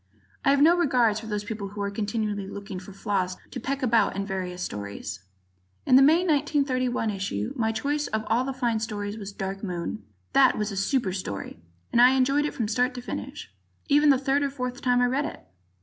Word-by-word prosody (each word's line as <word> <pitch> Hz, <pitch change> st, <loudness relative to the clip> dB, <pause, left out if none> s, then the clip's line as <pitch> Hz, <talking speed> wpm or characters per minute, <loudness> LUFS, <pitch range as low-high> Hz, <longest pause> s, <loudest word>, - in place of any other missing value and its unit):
I -, -, +3 dB
have 280 Hz, +1 st, +5 dB
no 335 Hz, +3 st, +6 dB
regard 250 Hz, -10 st, +2 dB
for 220 Hz, -, -9 dB
those 210 Hz, -1 st, -2 dB
people 210 Hz, -1 st, -5 dB
who 205 Hz, +1 st, -7 dB
are 200 Hz, -, -2 dB
continually 205 Hz, -1 st, -2 dB
looking 200 Hz, -1 st, -7 dB
for 190 Hz, +2 st, -11 dB
flaws 190 Hz, -2 st, -2 dB
to -, -, -5 dB
peck 275 Hz, +3 st, -3 dB
about 225 Hz, -6 st, +3 dB
in 195 Hz, 0 st, -2 dB
various 180 Hz, -2 st, -4 dB
stories. 100 Hz, -, -5 dB, 0.7 s
In 255 Hz, -, +5 dB
the 265 Hz, -, +8 dB
May, 320 Hz, +6 st, +5 dB
1931, 275 Hz, -7 st, +1 dB
issue 190 Hz, -, -3 dB
my 225 Hz, -1 st, +1 dB
choice 290 Hz, +7 st, -1 dB
of 220 Hz, 0 st, -2 dB
all 235 Hz, +3 st, +2 dB
the 270 Hz, -, -2 dB
fine 240 Hz, -4 st, 0 dB
stories 210 Hz, -1 st, -4 dB
was 200 Hz, -1 st, -6 dB
"Dark 195 Hz, 0 st, -5 dB
Moon." 180 Hz, +3 st, -4 dB, 0.3 s
That 270 Hz, -2 st, +5 dB
was 210 Hz, 0 st, -1 dB
a -, -, -5 dB
super 200 Hz, 0 st, 0 dB
story 100 Hz, -, -5 dB, 0.3 s
and 235 Hz, -, +4 dB
I 255 Hz, +2 st, +7 dB
enjoyed 275 Hz, +3 st, +2 dB
it 295 Hz, -, -3 dB
from 225 Hz, -, -1 dB
start 250 Hz, +4 st, +1 dB
to 245 Hz, -, -5 dB
finish, -, -, -6 dB, 0.4 s
even 295 Hz, +1 st, +5 dB
the 275 Hz, -, +6 dB
third 275 Hz, +2 st, +1 dB
or 280 Hz, -, +1 dB
fourth 250 Hz, -2 st, -5 dB
time 245 Hz, -1 st, +3 dB
I -, -, +4 dB
read 265 Hz, +4 st, 0 dB
it. -, -, -7 dB
225 Hz, 210 wpm, -26 LUFS, 200-270 Hz, 0.7 s, the